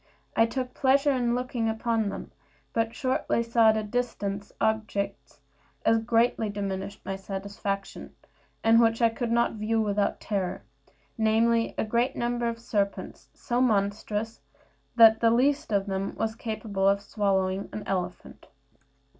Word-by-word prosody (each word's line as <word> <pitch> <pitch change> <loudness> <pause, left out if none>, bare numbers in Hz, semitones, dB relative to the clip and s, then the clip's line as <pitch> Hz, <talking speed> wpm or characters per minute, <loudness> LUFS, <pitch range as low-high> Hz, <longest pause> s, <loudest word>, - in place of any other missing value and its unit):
I 225 0 +4
took 255 +1 -4
pleasure 275 +2 +3
in 245 -3 +1
looking 250 -2 -1
upon 220 -1 0
them; - - -7 0.4
but 225 0 -1
shortly 255 -3 0
saw 230 -1 +4
at 220 - +3
a 215 - -1
distance 205 -3 -3
such - - -26
objects 220 -2 -2 0.5
as 225 0 +4
greatly 225 -1 +1
diminished 200 -1 -4
my 195 - -3
satisfaction, 195 +1 -5 0.5
and 225 +1 +6
which 225 -1 +3
I 230 - +5
could 235 +1 -3
not 235 0 +2
view 220 +1 -1
without 205 -2 0
terror, 195 -4 -3 0.6
namely, 230 +1 +2
a - - +1
great 235 +4 0
number 240 0 -1
of 230 - -4
serpents, 205 -4 -3
so 240 +1 -1
monstrous 210 -1 0 0.5
that 225 -1 +7
the 230 - +4
least 265 +3 +2
of 200 -2 +1
them 195 0 -3
was 220 0 -1
capable 215 -4 -2
of 200 0 +2
swallowing 195 -2 0
an 210 - -6
elephant. 180 -2 -4
220 Hz, 145 wpm, -27 LUFS, 200-235 Hz, 0.6 s, that